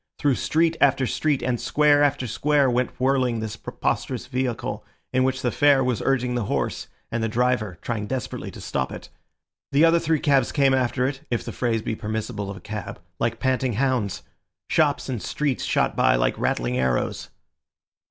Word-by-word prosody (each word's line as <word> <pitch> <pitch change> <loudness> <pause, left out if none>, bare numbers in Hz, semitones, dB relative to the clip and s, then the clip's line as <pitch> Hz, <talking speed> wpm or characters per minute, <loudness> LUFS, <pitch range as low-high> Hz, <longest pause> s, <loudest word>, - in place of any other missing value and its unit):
Through 145 -2 +2
street 160 +6 +1
after 135 -1 +4
street 145 +2 0
and 125 -2 -1
square 150 -1 +4
after 140 -3 +2
square 140 +3 +2
went 125 +1 -1
whirling 130 -3 +2
this 110 -1 -4
preposterous 125 -3 -3
vehicle, 125 -3 -3 0.3
in 130 0 +3
which 130 0 0
the 125 - +1
fare 145 -2 +4
was 125 -3 0
urging 125 -2 +1
the 120 -3 -1
horse - - -2 0.2
and 120 - -1
the 115 - 0
driver 120 -5 0
trying 110 -3 -3
desperately 130 -1 -4
to - - -11
stop - - -2
it. - - -9 0.6
The 145 +4 +5
other 165 +1 +5
three 160 -2 +1
cabs 135 -4 +2
came 140 -2 +3
after 125 -1 +1
it 135 +1 -3
(if 120 - -2
the - - -4
phrase 115 -3 -1
be 110 - -2
permissible 105 -1 -4
of 100 - -6
a - - -12
cab) 105 0 -6 0.2
like 115 0 -1
panting 130 -1 0
hounds. 125 -4 0 0.5
Shops 150 -3 +2
and 125 -5 -3
streets 145 -4 -1
shot - - +1
by - - +4
like - - +1
rattling - - -1
arrows. 65 -1 -1
125 Hz, 180 wpm, -24 LUFS, 115-140 Hz, 0.6 s, The